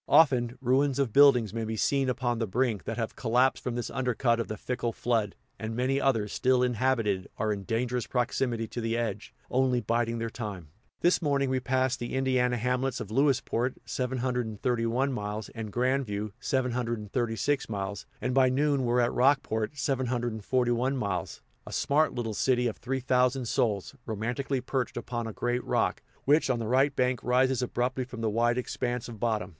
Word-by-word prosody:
Often, 130 -5 +4
ruins 135 +2 +2
of 135 -6 0
buildings 125 -7 +6
may 115 0 -2
be 110 0 -3
seen 135 +3 +1
upon 120 -2 -1
the 115 - -1
brink, 115 0 0
that 115 - -3
have 115 -2 -3
collapsed 125 +2 +2
from 125 - -2
this 120 - -3
undercut 125 -2 +1
of 115 - -2
the 110 - -5
fickle 120 -2 -2
flood; 115 -3 -1 0.2
and 110 0 -4
many 130 +3 +1
others, 115 -6 +1
still 130 0 +3
inhabited, 120 -6 0
are 110 -1 0
in 100 -1 -6
dangerous 120 +2 -1
proximity 120 -2 -1
to 120 - -4
the 115 0 -1
edge, 115 -2 -3 0.2
only 130 -1 +2
biding 115 +1 0
their 115 0 -2
time. 100 -10 -6 0.3
This 175 +2 +3
morning, 140 -3 +1
we 130 - +1
passed 130 0 0
the 120 +2 -4
Indiana 130 -2 +2
hamlets 125 +3 -1
of 105 - -6
Lewisport 130 -1 +1
(731 125 0 -1
miles) 105 -2 -4
and 110 -2 -6
Grand 130 +3 +1
View 105 0 -4
(736 120 -1 -1
miles), 100 -1 -4
and 125 - -1
by 130 -1 +5
noon 140 +1 +1
were 120 +1 +3
at 120 - +1
Rockport 130 -2 +1
(741 125 -1 0
miles), 100 -6 -3 0.2
a - - -7
smart 150 +2 +2
little 115 -3 -2
city 125 +3 +2
of 115 - -1
three 130 +1 -3
thousand 125 0 +2
souls, 110 -5 0
romantically 120 +5 -2
perched 125 -2 -2
upon 120 -1 -3
a - - -4
great 120 +3 -1
rock, - - 0 0.2
which 145 +1 +4
on 125 - +2
the 115 -2 -3
right 135 +4 +3
bank 125 -1 +1
rises 130 +1 +2
abruptly 125 +1 -1
from 125 -2 -8
the 110 -1 0
wide 120 +2 +2
expanse 125 -1 -2
of 115 -3 -9
bottom. 110 -5 0
125 Hz, 175 wpm, -28 LUFS, 115-130 Hz, 0.3 s, buildings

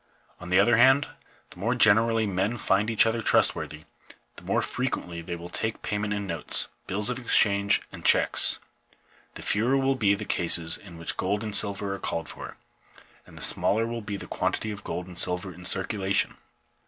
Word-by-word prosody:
On 90 - -9
the 90 - +4
other 120 -1 +4
hand, 135 +4 +5 0.4
the - - -13
more 115 +6 0
generally 110 0 +4
men 100 +4 -1
find 105 0 +1
each 115 -1 +4
other 115 0 -1
trustworthy, 75 -7 +1 0.5
the - - -12
more - - 0
frequently 90 -9 -4
will 85 0 -7
they 90 - -18
take 110 0 -3
payment 105 0 -2
in 105 -1 -2
notes, 85 -5 +2 0.2
bills 105 +5 -1
of 125 - -4
exchange, 100 -4 +3
and - - -11
checks; - - +3 0.8
the - - -8
fewer 120 +6 +1
will 135 0 +1
be 105 -6 +2
the 105 +1 -7
cases 85 -2 +2
in 90 -5 -12
which 85 - -4
gold 100 +3 -1
and 105 -2 -2
silver 100 -1 +1
are 100 - -6
called 85 -2 -4
for, - - -9 0.7
and - - -15
the - - -6
smaller 110 +2 0
will 115 0 -5
be 105 -1 -5
the - - -9
quantity 110 - -2
of 100 -1 -8
gold 90 - -5
and 90 -2 -7
silver 90 +1 -1
in 90 +2 -13
circulation. 100 0 0
100 Hz, 190 wpm, -26 LUFS, 90-115 Hz, 0.8 s, hand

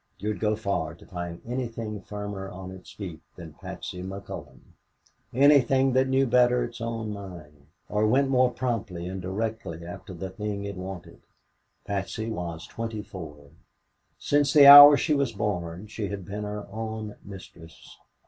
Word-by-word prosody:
You'd 105 -1 -3
go 110 0 +1
far 100 -6 -2
to - - -17
find 85 -2 -6
anything 115 -4 -4
firmer 100 -1 -6
on 95 0 -8
its 95 -1 -12
feet 85 -6 -8
than 85 -3 -10
Patsy 90 +3 -8
McCullon, 95 +2 -8 0.7
anything 135 -1 +4
that 130 +1 +3
knew 135 +1 +2
better 125 0 +3
its 120 0 -7
own 115 -2 -3
mind 80 -8 -11 0.2
or 105 +1 +1
went 135 +5 +3
more 130 -1 +3
promptly 115 -8 -3
and 95 +1 -5
directly 95 -3 -4
after 90 +2 -9
the 95 +2 -6
thing 105 0 -4
it 100 - -5
wanted. 95 -1 -8 0.6
Patsy 100 +3 -3
was 85 -5 -5
twenty 115 -2 -5
four. 75 -8 -10 0.7
Since 145 -1 +1
the 145 -2 +8
hour 145 +1 +12
she 155 - +1
was 140 -5 0
born, 95 -3 -3
she 105 -1 -5
had 100 -2 -6
been 105 +3 -5
her 105 0 -5
own 110 -1 -5
mistress. 90 -4 -13
105 Hz, 155 wpm, -26 LUFS, 90-115 Hz, 0.7 s, hour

